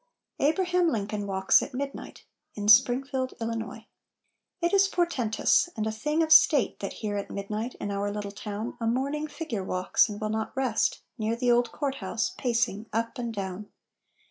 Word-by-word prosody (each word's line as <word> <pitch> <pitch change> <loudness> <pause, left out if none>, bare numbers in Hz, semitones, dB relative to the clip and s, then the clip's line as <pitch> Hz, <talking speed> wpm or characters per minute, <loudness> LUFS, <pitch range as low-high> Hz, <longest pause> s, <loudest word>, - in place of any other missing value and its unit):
ABRAHAM 355 +4 +2
LINCOLN 205 -4 -2
WALKS 190 -1 +4
AT 280 - -6
MIDNIGHT 275 +1 -6 0.3
[In 205 -1 -4
Springfield, 260 +3 +4
Illinois] 225 -1 -4 0.7
It 345 +1 0
is 395 0 +5
portentous, 345 - +1
and 215 - -1
a 220 - -1
thing 300 +9 0
of 315 - -3
state 300 -4 +6
That 195 - -4
here 205 -1 -1
at 200 - -4
midnight, 210 +4 -4
in 205 - -4
our 200 +1 -1
little 205 -1 -4
town, 210 +2 -5
A 230 - -1
mourning 280 +6 -1
figure 290 - -4
walks, 185 +2 +2
and 205 0 -6
will 215 - -2
not 220 +4 -3
rest, 255 -5 0 0.2
Near 220 +1 0
the 245 +1 +1
old 240 -1 +2
court 275 -2 -3
house 210 +1 -2
pacing 230 -3 -1
up 230 +3 -2
and 235 -1 -3
down. 200 -1 -5
230 Hz, 170 wpm, -27 LUFS, 210-275 Hz, 0.7 s, state